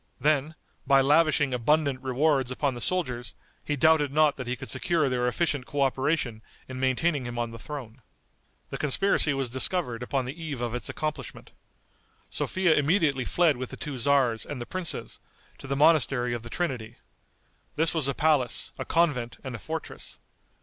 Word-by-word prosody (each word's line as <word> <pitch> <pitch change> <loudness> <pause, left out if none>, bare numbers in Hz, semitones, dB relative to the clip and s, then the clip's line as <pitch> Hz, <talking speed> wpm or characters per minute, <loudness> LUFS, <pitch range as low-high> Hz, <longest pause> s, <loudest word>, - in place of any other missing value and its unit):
Then, 150 +1 +1 0.3
by 135 0 +6
lavishing 150 -1 +3
abundant 140 +2 +1
rewards 135 0 +1
upon 135 +1 -1
the 120 - -7
soldiers, 130 -9 -2 0.3
he 150 - -1
doubted 150 -1 +3
not 150 0 +3
that 130 -2 -7
he 125 - -1
could 135 +1 -9
secure 160 +3 +1
their 125 -1 0
efficient 140 -1 -1
coöperation 135 -3 0 0.3
in 130 -1 -7
maintaining 130 +2 +1
him 120 0 -6
on 120 -1 -2
the 115 - -9
throne. 130 -3 -8 0.7
The - - -5
conspiracy 155 +2 +3
was 135 -1 -1
discovered 125 -1 +1
upon 130 +1 -1
the 140 +7 -7
eve 145 -5 -4
of 120 -1 -3
its 125 - -3
accomplishment. 155 -1 -5 0.8
Sophia 185 -3 +1
immediately 145 -4 +2
fled 165 -2 +2
with 130 0 -5
the - - -8
two 145 -3 -5
tzars 125 -3 +2
and 145 - -6
the 120 - -5
princes, 185 +2 -5 0.4
to - - -9
the 135 - -1
monastery 135 -5 +3
of 120 - -3
the 120 - -10
Trinity. 125 -8 -3 0.8
This 160 0 +2
was 160 -5 +1
a 140 - -1
palace, 150 -6 +2
a - - -3
convent 145 -9 +1
and 130 -2 -6
a 115 - -6
fortress. 160 +7 -6
135 Hz, 170 wpm, -27 LUFS, 125-155 Hz, 0.8 s, by